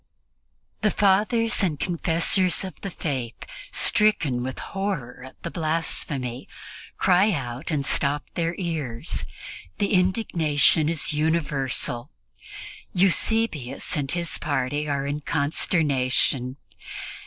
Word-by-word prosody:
The 215 - +3
Fathers 210 +4 +2
and 160 -7 0
Confessors 175 +2 +2
of 190 - -5
the 195 - -4
Faith, 130 -9 -4 0.4
stricken 165 -13 +2
with 130 +1 -4
horror 190 -12 -4
at 130 - -12
the 170 - -4
blasphemy, 155 -6 -2 0.5
cry 190 +3 +4
out 130 -4 -4
and 145 -3 -1
stop 140 +1 +2
their 170 0 -1
ears. 155 -10 -3 0.5
The 200 - 0
indignation 170 -5 +3
is 165 -2 +1
universal. 145 -5 0 0.9
Eusebius 180 - +1
and 140 -3 -1
his 170 -1 0
party 145 +1 -1
are 140 -1 -1
in 145 +1 -3
consternation. 140 -4 +1
155 Hz, 105 wpm, -24 LUFS, 135-180 Hz, 0.9 s, cry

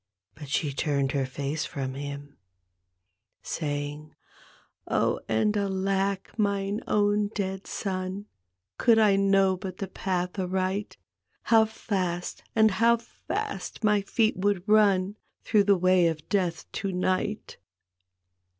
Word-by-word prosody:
" 95 0 -57
But 145 -2 -10
she 145 0 0
turned 140 -1 0
her 135 -2 0
face 140 +3 -3
from 135 -2 -4
him, 140 +1 -7 1.0
Saying, 145 0 -4 0.4
" - - -32
Oh - - +1
and 110 - +2
alack, 195 -1 -1
mine 200 +1 0
own 205 0 +2
dead 190 -1 -3
son, 190 0 -3 0.5
Could 230 -2 +5
1 195 -2 +4
know 195 -1 +3
hut 185 -3 -6
the 195 - -4
path 180 0 -3
aright. 190 +2 -2 0.5
How 225 -1 +5
fast 185 -5 -3
and 220 -1 +5
how 230 +4 +4
fast 230 0 -5
my 210 -1 +3
feet 220 +2 +1
would 195 0 0
run 205 -2 +3 0.3
Through 210 -3 +3
the 200 -1 +4
way 180 -1 +4
o' 165 - -1
Death 170 +2 -2
to 195 - -3
night!" 185 +3 -1
190 Hz, 130 wpm, -27 LUFS, 165-205 Hz, 1.0 s, Could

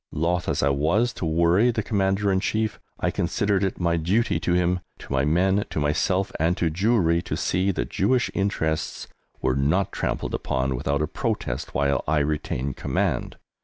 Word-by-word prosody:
Loth 85 +3 0
as - - 0
I 70 - +4
was 85 - +1
to 85 - -3
worry 85 +8 +3
the 110 -2 -1
Commander 100 -1 +1
in 95 - +2
Chief, 110 +2 -1 0.2
I - - 0
considered 100 -1 0
it 95 - -1
my 85 -1 +1
duty 95 +9 +1
to 90 - 0
him, 90 0 +2 0.2
to - - -8
my 65 0 +2
men, 95 +6 +2
to - - -3
myself, 85 +6 +1
and 85 +3 +2
to 85 -2 +1
Jewry 90 -2 +2
to - - -4
see 95 +2 0
that 95 - -2
Jewish 125 +6 +1
interests 80 -6 -1 0.4
were 65 - +2
not 90 +9 +1
trampled - - -2
upon 65 0 -1
without 70 +4 -1
a - - 0
protest - - -3
while 70 +1 +1
I 80 +1 +2
retained 70 -3 -1
command. - - -1
85 Hz, 180 wpm, -24 LUFS, 75-100 Hz, 0.4 s, I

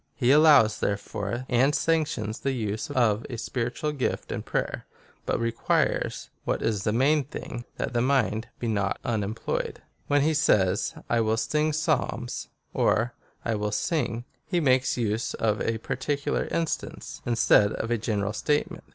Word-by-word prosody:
He 125 -1 +3
allows, 145 -8 +6
therefore, 100 +4 -2
and 135 +4 +3
sanc 165 -2 +2
tions 110 -6 -4
the 135 - -1
use 110 -3 -3
of 115 -3 +2
a 120 - -4
spiritual 125 +6 -2
gift 140 -4 -2
in - - -2
prayer, - - -3 0.4
but - - +1
requires, 115 0 0
what - - -1
isthe 105 -2 0
main 140 +6 +3
thing, 120 -2 -7
that - - -3
the 120 - +2
mind 120 -4 +1
be 120 - -3
not 100 -3 0
unemployed.^ 110 -1 -2
I - - -26 0.3
When 145 0 +3
he 160 +2 +3
says, 100 -10 +2
/ - - -30
will 115 -1 +2
sing 150 +6 +1
Psalms, 155 -6 -1 0.3
or, 120 +2 +2 0.2
/ - - -35
will 105 -2 -1
sing, 120 - -1 0.2
he 175 - +1
Y - - -1
makes 130 -1 +3
use 110 -1 -1
of 110 -2 0
a 115 - 0
particular 140 +5 -2
instance, 165 -2 -3
instead 115 -3 +4
of 115 - -3
a 120 - +1
general 105 -2 -1
statement. 145 +6 -1
120 Hz, 160 wpm, -27 LUFS, 110-140 Hz, 0.4 s, allows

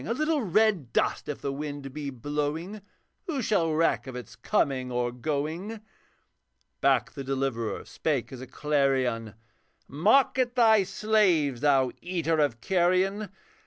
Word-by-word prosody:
A 230 - -2
little 310 +1 +1
red 205 - +2
dust, - - 0
if 150 - -5
the 140 - -2
wind 145 -1 -6
be 145 -1 -4
blowing 150 - -3 0.5
Who 285 -7 -2
shall 170 -7 +1
reck 155 -5 +1
of 130 - -7
its 125 -1 -8
coming 130 - 0
or 120 0 -1
going?' 155 - -3 1.0
Back 135 -2 +2
the 140 - -7
Deliverer 130 -4 -2
spake 145 -6 -2
as 130 -1 -8
a 130 - -8
clarion, 130 -7 0 0.5
'Mock 220 - +3
at 245 -1 +1
thy 220 -4 +5
slaves, 180 - +2
thou 135 -3 +3
eater 165 -3 -1
of 130 -6 +1
carrion! 190 - +1
150 Hz, 140 wpm, -27 LUFS, 130-195 Hz, 1.0 s, thy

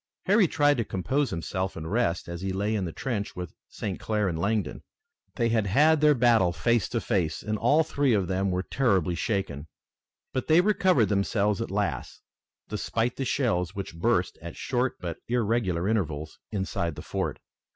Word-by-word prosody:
Harry 200 0 +5
tried 145 -2 +3
to 115 - +1
compose 130 +9 -1
himself 95 +3 -3
and 80 +2 -6
rest, 105 -8 0
as 85 0 -6
he 95 0 -2
lay 100 +3 -1
in 100 -4 0
the 85 - -4
trench 105 +1 -3
with 90 -2 -6 0.2
St. 95 -3 -5
Clair 105 -2 0
and 85 -3 -2
Langdon. 100 -3 -1 0.5
They 115 -2 +1
had 110 -3 +1
had 150 +9 +4
their 150 -1 +6
battle 115 -7 +4
face 115 +3 +1
to 120 - -1
face 90 -9 -1
and 110 +1 -1
all 150 +8 +3
three 140 -4 +1
of 95 -3 0
them 95 +1 0
were 90 0 -1
terribly 100 - +1
shaken, 85 -5 -2 0.7
but 130 - -2
they 160 +2 +6
recovered 185 - +3
themselves 105 +1 +1
at 115 - -3
last, 100 -4 -3 0.4
despite 115 +3 -1
the 135 - -2
shells 110 - 0
which 100 -3 -5
burst 85 - 0
at 85 -1 -8
short 125 0 -1
but 85 -2 -5
irregular 110 -7 0
intervals 80 -8 -2
inside 95 -5 -2
the - - -8
fort. - - -2
105 Hz, 180 wpm, -27 LUFS, 90-120 Hz, 0.7 s, their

